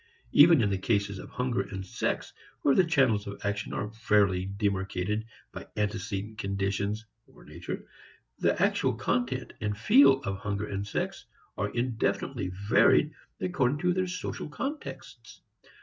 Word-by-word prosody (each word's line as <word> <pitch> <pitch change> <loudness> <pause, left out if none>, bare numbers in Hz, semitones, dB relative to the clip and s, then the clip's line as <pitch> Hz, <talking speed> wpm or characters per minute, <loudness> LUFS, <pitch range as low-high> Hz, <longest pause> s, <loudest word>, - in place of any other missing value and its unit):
Even 155 -4 +7
in 100 - +1
the 95 - 0
cases 100 -1 0
of - - -9
hunger 125 -5 -1
and 95 0 -6
sex, - - -2 0.3
where 140 - +5
the 185 - +5
channels 130 - +2
of 100 0 -7
action 100 0 -2
are 105 - -3
fairly 100 -4 +2
demarcated 100 +1 -1 0.3
by - - -9
antecedent 105 0 -3
conditions 100 +2 -1 0.2
(or - - -18
"nature"), - - -7 0.5
the - - +2
actual - - +2
content 125 +1 -1
and 105 -1 -1
feel 135 +4 +6
of 95 -1 -3
hunger 100 0 -2
and 100 0 -4
sex, - - -3 0.3
are 100 - -1
indefinitely 120 -2 -1 0.2
varied 145 +6 +5 0.3
according 145 -7 +1
to 180 +3 +1
their 185 0 0
social 180 -3 -5
contexts. 280 - -7
105 Hz, 145 wpm, -29 LUFS, 100-130 Hz, 0.5 s, Even